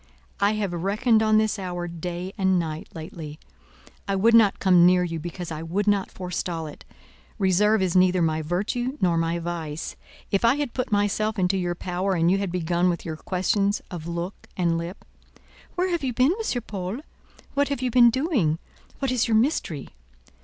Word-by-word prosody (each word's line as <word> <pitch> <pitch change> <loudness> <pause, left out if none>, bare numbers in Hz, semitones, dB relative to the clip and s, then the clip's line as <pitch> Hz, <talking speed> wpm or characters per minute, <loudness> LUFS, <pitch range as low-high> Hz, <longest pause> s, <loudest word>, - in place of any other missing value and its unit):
I 200 +1 +3
have 205 -4 -2
reckoned 210 +6 +2
on 215 0 +4
this 215 -1 +1
hour 175 -2 -4
day 175 +2 -5
and 190 -2 +2
night 160 -2 -3
lately. 160 -2 -8 0.7
I 195 - 0
would 225 +4 +4
not 220 -4 +6
come 180 -3 +5
near 180 0 +5
you, 165 -2 -3
because 175 +1 -6
I 155 0 -4
would 180 +5 -1
not 205 -2 +2
forestall 180 -2 -4
it. 150 - -10 0.5
Reserve 205 +1 +3
is 185 -2 0
neither 185 0 +4
my 160 -1 +1
virtue 210 - -2
nor 175 -2 +2
my 165 +1 0
vice. 165 -2 -4 0.4
If 195 - +1
I 235 +3 +5
had 290 -4 -3
put 255 - -3
myself 210 +1 +1
into 185 0 +2
your 175 -2 -1
power, 185 +2 -1
and 170 0 +3
you 195 - +2
had 195 -3 -2
begun 175 0 +1
with 170 - -3
your 160 -2 -4
questions 195 +4 0
of 170 -3 -6
look 170 +3 -5
and 170 -2 +2
lip—Where 185 - -7
have 340 -4 -1
you 255 -2 -1
been, 255 +6 +4 0.2
M. 245 - -1
Paul? 200 +3 -5 0.5
What 285 0 +1
have 280 -3 -2
you 250 - 0
been 240 0 +7
doing? 245 - +1 0.4
What 270 -2 -1
is 250 -1 +1
your 220 -1 +3
mystery? 220 - 0
185 Hz, 185 wpm, -25 LUFS, 170-215 Hz, 0.7 s, been